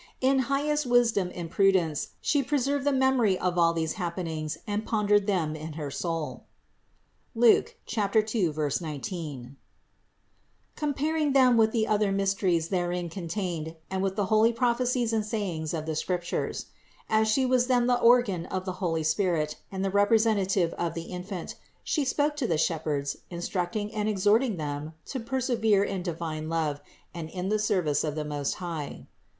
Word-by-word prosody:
In 265 +1 +3
highest 295 +1 +1
wisdom 230 -7 +3
and 170 -2 -6
prudence 185 -6 +2
She 290 - +2
pre 290 +3 0
served 275 +1 0
the - - +4
memory 260 -7 +3
of 180 -1 0
all 165 -1 +5
these 160 -1 -1
happenings 165 -3 -3
and 210 0 -2
pondered 210 -2 +2
them 165 -6 0
in 155 0 -7
her 150 -2 -5
soul, 165 0 -4 0.9
(Luke 230 0 +4
2, 215 -3 +1 0.3
19), 150 - -6 1.2
comparing 300 0 0
them 255 -3 +6
with 220 -1 +4
the 220 -2 +1
other 210 -2 +1
mysteries 195 -4 +1
therein 175 -1 -1
contained 170 -2 -4 0.2
and 190 0 -1
with 190 0 -1
the 205 -1 0
holy 220 +3 +4
prophecies 240 0 +1
and 220 -1 +1
sayings 185 -8 -3
of 155 -2 -3
the 160 -1 -2
Scriptures. 175 +2 -2 0.4
As 220 0 +3
She 260 +5 +2
was 250 -1 +2
then 245 -2 +3
the 245 0 +2
organ 230 -8 +4
of 185 0 -3
the 185 - -2
holy 165 -3 0
Spirit 155 -2 0
and 190 0 -2
the 195 - 0
representative 205 -4 +3
of 170 - -1
the 165 - -4
Infant, 180 0 -5 0.3
She 295 -3 0
spoke 290 +3 +1
to 265 -5 0
the 165 - +1
shepherds, 150 -3 -1
instructing 180 +4 -3
and 215 -1 -1
exhorting 210 +2 +2
them 150 0 -4
to 265 - -4
persevere 230 -4 +1
in 195 -2 -2
divine 160 -3 -4
love 155 -3 -1 0.3
and 165 -2 -6
in 185 +2 -4
the 215 0 +1
service 180 -8 +1
of 150 -2 -2
the 155 -1 -3
Most 145 -2 -2
High. 165 -5 -6
195 Hz, 160 wpm, -27 LUFS, 165-230 Hz, 1.2 s, them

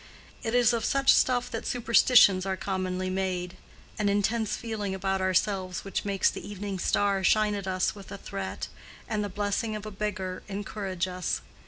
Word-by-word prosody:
It 225 +1 -2
is 245 -1 +5
of 230 -2 -1
such 275 +2 +4
stuff 245 -1 +2
that 225 - -4
superstitions 235 -5 +5
are 190 0 -2
commonly 185 -1 -2
made: 185 -1 -2 0.4
an 205 -1 +2
intense 215 +2 +1
feeling 210 -4 -3
about 190 0 -1
ourselves 185 -1 0
which 195 - -3
makes 200 -1 +2
the - - -7
evening 200 -1 -5
star 200 +2 +1
shine 215 +2 +3
at 200 -2 -4
us 185 -1 0
with 200 -2 -12
a 200 - -5
threat, 95 - -5 0.4
and 210 -1 -1
the 205 - -3
blessing 205 +3 -1
of 210 0 -6
a 215 - -6
beggar 190 -3 -3
encourage 195 -2 -3
us. 180 -1 -2
200 Hz, 175 wpm, -28 LUFS, 185-215 Hz, 0.4 s, is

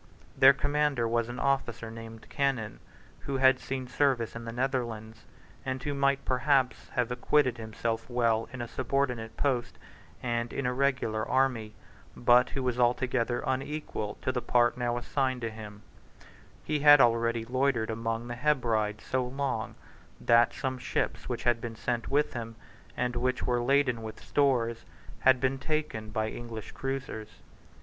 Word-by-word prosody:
Their 135 - +8
commander 145 -3 0
was 115 0 0
an 120 - -6
officer 125 -4 -1
named 115 0 -10
Cannon, 135 -6 -1 0.4
who 140 -1 -3
had 130 0 +5
seen 130 -1 -4
service 125 -3 +1
in 115 0 -7
the 115 - -4
Netherlands, 115 -3 -3 0.4
and 130 -1 -3
who 145 - -2
might 140 0 +1
perhaps 130 -1 +1
have 125 -1 0
acquitted 125 0 +2
himself 115 +1 -3
well 115 -2 +1
in 130 -2 -5
a - - -6
subordinate 125 -2 -2
post 125 -4 -1 0.5
and 120 -1 -1
in 140 - -3
a 125 - +1
regular 130 -5 0
army, 125 -5 +1 0.4
but 120 +1 +5
who 135 - -3
was 125 -1 -1
altogether 120 0 +1
unequal 130 -5 -3
to 130 - +1
the 125 -1 -2
part 120 -1 +3
now 120 -1 -1
assigned 130 0 -1
to 115 -1 -3
him, 105 -1 -10 0.8
He 150 -1 -1
had 145 0 +8
already 115 -1 +3
loitered 130 -2 +1
among 115 +1 -3
the 120 - -4
Hebrides 115 -6 0
so 130 -1 0
long 130 -4 -3 0.4
that 120 0 +4
some 130 -1 -3
ships - - -2
which - - -3
had 120 -1 +2
been 115 -1 -5
sent 120 +1 -2
with 145 +2 +1
him, 115 -2 -5 0.4
and 125 0 -1
which 125 +1 0
were 120 -1 +1
laden 130 -2 +2
with 110 -1 -7
stores, 120 -5 +1 0.4
had 130 -1 +5
been 135 +1 0
taken 150 -8 -2
by 110 0 -1
English 115 -4 -7
cruisers. 135 -5 -4
125 Hz, 155 wpm, -29 LUFS, 115-135 Hz, 0.8 s, Their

